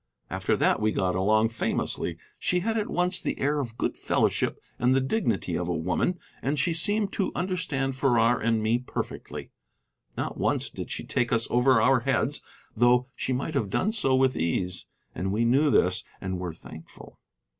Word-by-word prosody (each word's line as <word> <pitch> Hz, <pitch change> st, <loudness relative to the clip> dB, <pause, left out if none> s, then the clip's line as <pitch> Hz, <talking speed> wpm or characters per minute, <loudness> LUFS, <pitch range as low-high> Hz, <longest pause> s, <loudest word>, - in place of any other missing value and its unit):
After -, -, 0 dB
that -, -, +2 dB
we 110 Hz, 0 st, +2 dB
got 95 Hz, -3 st, 0 dB
along 110 Hz, +4 st, +3 dB
famously. 115 Hz, -, -2 dB, 0.2 s
She 180 Hz, 0 st, +1 dB
had 225 Hz, +4 st, -1 dB
at 215 Hz, -2 st, -1 dB
once 180 Hz, +1 st, 0 dB
the -, -, -2 dB
air 145 Hz, +2 st, +1 dB
of 120 Hz, -4 st, -5 dB
good -, -, -1 dB
fellowship -, -, 0 dB, 0.2 s
and 125 Hz, +2 st, +3 dB
the -, -, +4 dB
dignity 125 Hz, -, -1 dB
of 90 Hz, 0 st, -2 dB
a 90 Hz, -, -1 dB
woman, 90 Hz, -, 0 dB, 0.2 s
and 140 Hz, +3 st, -1 dB
she 170 Hz, +4 st, +1 dB
seemed 205 Hz, +5 st, +2 dB
to 195 Hz, -, 0 dB
understand 160 Hz, -8 st, -1 dB
Farrar 120 Hz, -3 st, +3 dB
and 115 Hz, -1 st, +1 dB
me 115 Hz, +2 st, +2 dB
perfectly. 125 Hz, -, -6 dB, 0.7 s
Not -, -, -3 dB
once -, -, 0 dB
did -, -, -7 dB
she -, -, -5 dB
take 120 Hz, -, -1 dB
us 115 Hz, 0 st, +2 dB
over 125 Hz, 0 st, +4 dB
our 125 Hz, +3 st, +4 dB
heads, -, -, 0 dB, 0.3 s
though 125 Hz, +2 st, +3 dB
she -, -, -2 dB
might 130 Hz, +5 st, -2 dB
have 115 Hz, -8 st, 0 dB
done 195 Hz, -, +1 dB
so 170 Hz, -, +2 dB
with 130 Hz, 0 st, +3 dB
ease, 90 Hz, +2 st, -2 dB, 0.3 s
and 95 Hz, +3 st, -2 dB
we 110 Hz, +3 st, +1 dB
knew 135 Hz, +6 st, +4 dB
this 90 Hz, -7 st, +2 dB, 0.2 s
and 95 Hz, -1 st, -4 dB
were 90 Hz, -1 st, -3 dB
thankful. 80 Hz, 0 st, -13 dB
125 Hz, 185 wpm, -27 LUFS, 105-145 Hz, 0.7 s, the